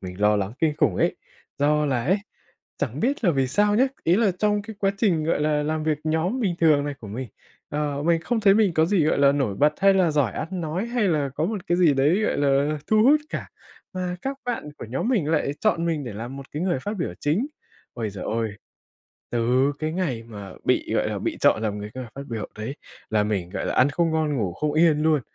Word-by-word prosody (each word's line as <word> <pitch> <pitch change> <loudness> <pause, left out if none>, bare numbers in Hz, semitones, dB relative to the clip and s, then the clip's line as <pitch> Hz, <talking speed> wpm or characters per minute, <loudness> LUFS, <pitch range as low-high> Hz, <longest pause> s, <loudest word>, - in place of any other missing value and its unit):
mình 90 +1 -8
lo 105 0 +4
lắng 100 0 -2
kinh 155 -2 +1
khủng - - +2
ấy, - - +1 0.4
do 150 +1 +2
là 125 -4 0
ấy 190 +7 +2 0.6
chẳng 140 +1 -3
biết 260 - 0
là 175 - +5
vì 135 -3 +1
sao 205 +8 +2
nhá, 255 - +5 0.2
ý 170 +3 +4
là 215 -3 +3
trong 210 -1 +1
cái 220 -1 -9
quá 195 -1 +3
trình, 175 -9 +2
gọi 160 - +1
là, 150 -1 +1
làm 155 +1 -1
việc 155 -2 +1
nhóm 165 +11 0
bình 190 -6 0
thường 150 -3 +4
này 145 -1 -3
của 105 - -9
mình, 120 +3 -5 0.4
ờ, 145 -1 -2
mình 165 0 +2
không 225 +7 -1
thấy 195 -2 +5
mình 205 -5 +3
có 160 - +4
gì, 180 -3 +2
gọi 155 - +2
là, 140 0 +5
nổi 135 -8 0
bật 150 +1 +4
hay 195 0 +5
là 185 -4 +3
giỏi 145 -8 +1
ăn 165 - -4
nói 175 +3 -2
hay 235 -4 0
là 150 -5 +1
có 155 - -1
một 205 -2 -4
cái 175 - +2
gì 165 -5 +5
đấy, 150 +9 +3
gọi - - 0
là, 145 +2 +2
thu 215 0 +4
hút 295 +5 +5
cả, - - -5 0.4
mà 180 -1 -3
các 270 +1 -3
bạn 235 -11 -3
của - - -6
nhóm 135 - -1
mình 205 - +1
lại 150 -3 +1
chọn 170 -6 +1
mình 160 -4 -1
để 120 - -6
làm 120 +6 -6
một 140 -1 -10
cái 150 +3 -3
người 180 -7 0
phát 210 +7 -4
biểu 165 - -2
chính. 165 - +1 0.5
Ôi 115 -3 -3
giời 95 -2 -7
ôi, 110 -2 -2 0.8
từ 125 +4 +2
cái 155 0 -2
ngày 160 -10 -2
mà 105 -4 -9
bị, - - +1
gọi - - +1
là, - - -3
bị - - -3
chọn 110 - +4
làm 105 -1 -2
người, 105 +1 -6
ơ, 130 0 -5
phát 140 - -6
biểu 115 -3 -4
ấy 110 +7 -6 0.3
là 110 -1 +2
mình, 100 -5 -2
gọi - - -3
là, - - -1
ăn 130 +3 +4
không 165 +3 +1
ngon 155 -2 0
ngủ 100 -8 -1
không 150 +8 -1
yên 155 -1 +4
luôn, 155 -3 +3
150 Hz, 250 wpm, -24 LUFS, 130-180 Hz, 0.8 s, là